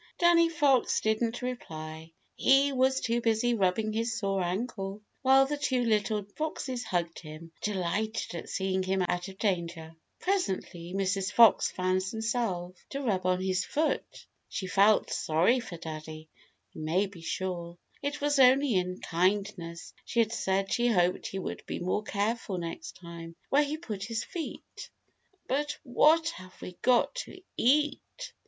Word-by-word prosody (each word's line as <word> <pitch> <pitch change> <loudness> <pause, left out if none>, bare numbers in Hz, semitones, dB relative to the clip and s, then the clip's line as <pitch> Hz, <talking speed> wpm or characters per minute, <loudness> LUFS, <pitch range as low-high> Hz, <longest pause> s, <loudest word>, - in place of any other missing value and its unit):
Danny 340 -1 +5
Fox 285 -6 +3
didn't 225 +3 0
reply. 160 -10 -6 0.2
He 275 +2 +4
was 265 +1 +2
too 235 0 0
busy 230 +1 +2
rubbing 215 +1 +1
his 225 +1 -1
sore 195 -3 0
ankle, 195 +2 -3 0.2
while 270 0 +6
the 295 +2 -2
two 260 -4 +1
little 215 -2 +1
foxes 265 -5 -3
hugged 175 -5 -2
him, 155 +1 -10
delighted 210 +2 -2
at 170 - -6
seeing 190 0 0
him 190 0 0
out 180 +2 -1
of 190 -1 -10
danger. 170 -5 -2 0.3
Presently 190 - -2
Mrs. 195 0 0
Fox 230 -2 +6
found 185 0 0
some 220 +4 -4
salve 195 -7 -1
to 275 - -4
rub 190 -7 0
on 185 0 +1
his 185 -1 +1
foot. 310 +1 -2 0.2
She 190 - -4
felt 200 +3 +4
sorry 175 +11 +2
for 200 -8 -7
Daddy, 155 -1 -8 0.4
you - - -8
may 170 +6 +1
be 190 -4 -11
sure. 175 0 -4 0.2
It 285 0 -3
was 290 -1 +2
only 265 0 +6
in 180 -1 -1
kindness 180 -1 -1
she 235 - -2
had 225 -1 0
said 195 -2 0
she 240 0 +2
hoped 180 -5 +2
he 195 - -5
would 190 - -5
be - - -3
more 185 +4 -1
careful 210 -1 -2
next 165 -2 -6
time 170 -1 -9 0.2
where 285 - +5
he 295 +1 -1
put 210 - -5
his 225 +1 -2
feet. 340 -4 -7 0.6
"But 290 +2 -1
what 310 +5 +4
have 185 - -11
we - - -7
got 250 -1 +3
to - - -11 0.2
eat?" 295 +4 +3
200 Hz, 160 wpm, -29 LUFS, 180-250 Hz, 0.6 s, while